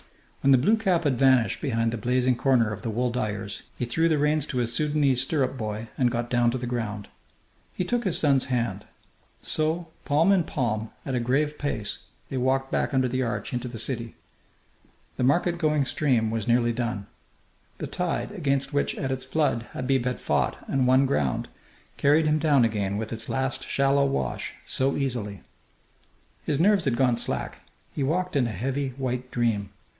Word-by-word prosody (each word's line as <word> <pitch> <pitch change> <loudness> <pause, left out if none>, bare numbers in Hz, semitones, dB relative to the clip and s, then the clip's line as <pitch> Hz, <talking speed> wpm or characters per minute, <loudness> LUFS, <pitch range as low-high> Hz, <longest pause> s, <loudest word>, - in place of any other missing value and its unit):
When 140 - +2
the 130 - +8
blue 180 - +4
cap 185 -6 +1
had 135 -5 +1
vanished 130 -4 +3
behind 115 -3 0
the 115 - -4
blazing 125 +2 +2
corner 120 -4 +2
of 105 - -8
the 115 - -3
wool 120 +3 0
dyers, 105 -4 -3 0.2
he 125 - -1
threw 160 +8 +1
the 155 - +2
reins 150 0 +2
to 130 - -4
his 120 -1 0
Sudanese 145 -2 +2
stirrup 135 -1 0
boy 110 -2 -4
and 125 -2 +4
got 120 0 -3
down 120 -1 +3
to 125 - -1
the 125 - -4
ground. 110 -4 -3 0.7
He - - -1
took 240 +7 -1
his 185 - +2
son's 140 -3 +3
hand. 115 -6 -2 0.6
So, 160 +2 -1
palm 155 +6 +3
in 190 -3 +4
palm, 110 -6 -2 0.2
at 135 - -3
a 125 - +1
grave 145 +5 0
pace, 110 -8 -2 0.3
they 135 - -3
walked 135 +1 0
back - - 0
under 130 -1 +3
the 130 +1 -1
arch 120 0 -3
into 125 0 -2
the 120 -1 -7
city. 115 0 -2 1.0
The - - 0
market 170 +6 +2
going 150 -4 +2
stream 120 -5 +1
was 115 -2 -3
nearly 120 0 +3
done. 115 -4 -3 0.7
The - - -4
tide, 180 +2 -2
against 140 -8 -1
which 145 - 0
at 135 -3 -3
its 130 -1 -2
flood 130 -4 0
Habib 130 -1 0
had 125 0 -1
fought - - 0
and 130 -2 +1
won 130 +2 +5
ground, 75 - 0 0.5
carried 150 +3 +4
him 155 0 +2
down 145 -6 +4
again 100 -3 -1
with 110 +1 -4
its 115 0 -6
last 130 0 -1
shallow 140 0 +2
wash 65 - -2
so 135 +1 +1
easily! 115 -8 -3 1.0
His 145 -2 -1
nerves 200 +1 +4
had 125 -4 +1
gone 125 -2 +3
slack. - - -2 0.3
He - - -3
walked 175 +5 0
in 130 -4 +3
a - - -3
heavy 130 +5 -2
white 125 -1 -3
dream. 115 -5 0
130 Hz, 190 wpm, -26 LUFS, 115-145 Hz, 1.0 s, the